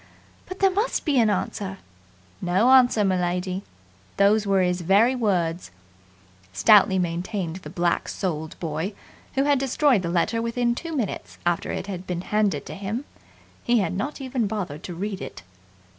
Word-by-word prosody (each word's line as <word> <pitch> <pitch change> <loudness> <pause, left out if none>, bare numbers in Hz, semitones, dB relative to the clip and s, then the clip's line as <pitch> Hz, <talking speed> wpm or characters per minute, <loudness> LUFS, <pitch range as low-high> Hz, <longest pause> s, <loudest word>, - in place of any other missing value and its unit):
But 370 - -7
there 390 -1 +3
must 420 +6 -1
be 285 -5 +3
an 225 -2 +4
answer!" 195 -1 -2 0.6
"No 190 +8 +3
answer, 250 -4 +6
m'lady. 180 0 0 0.6
Those 205 +1 +4
was 195 -2 +3
his - - -6
very 200 +8 +4
words," 180 - 0 0.8
stoutly 190 - +5
maintained 175 0 -2
the 165 -5 -10
black 175 +1 0
souled 160 -5 -4
boy, 165 +4 -3 0.4
who 270 - +3
had 285 -1 +3
destroyed 270 -3 +2
the 170 - -3
letter 180 +7 +1
within 235 +1 0
two 330 +6 -5
minutes 230 -9 -4
after 175 -1 0
it - - -4
had 185 -2 -6
been 175 -1 -2
handed 210 +1 0
to - - -7
him. 210 +7 -4 0.6
He 240 0 +3
had 190 -6 0
not 270 +12 -3
even 255 -4 -1
bothered 185 -8 -4
to 175 - -6
read 195 +2 -4
it. - - -8
200 Hz, 160 wpm, -24 LUFS, 180-235 Hz, 0.8 s, answer